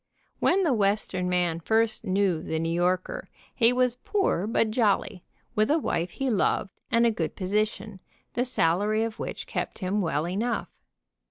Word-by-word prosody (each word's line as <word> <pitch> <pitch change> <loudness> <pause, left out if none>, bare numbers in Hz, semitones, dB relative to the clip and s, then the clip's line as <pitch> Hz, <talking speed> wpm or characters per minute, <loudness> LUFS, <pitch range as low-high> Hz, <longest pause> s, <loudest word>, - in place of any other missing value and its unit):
When 385 +2 +3
the 315 -7 +3
Western 200 -4 0
man 175 -2 +1
first 220 +5 +1
knew 190 -4 +1
the 160 - -3
New 165 +1 -1
Yorker 180 +2 -1 0.2
he 230 -1 +4
was 250 -1 +1
poor 385 - 0
but 225 -1 +1
jolly, 210 -4 +1 0.3
with 215 0 +2
a 305 - +4
wife 175 - -1
he 270 - -2
loved, 205 -3 0
and 235 -2 +3
a 230 - +4
good 165 -7 -3
position, 210 +1 -2 0.3
the 245 - +1
salary 210 -1 +1
of 225 -1 -4
which - - -5
kept - - -4
him 200 +1 -1
well 160 -2 0
enough. 215 +7 -2
210 Hz, 165 wpm, -27 LUFS, 180-230 Hz, 0.3 s, he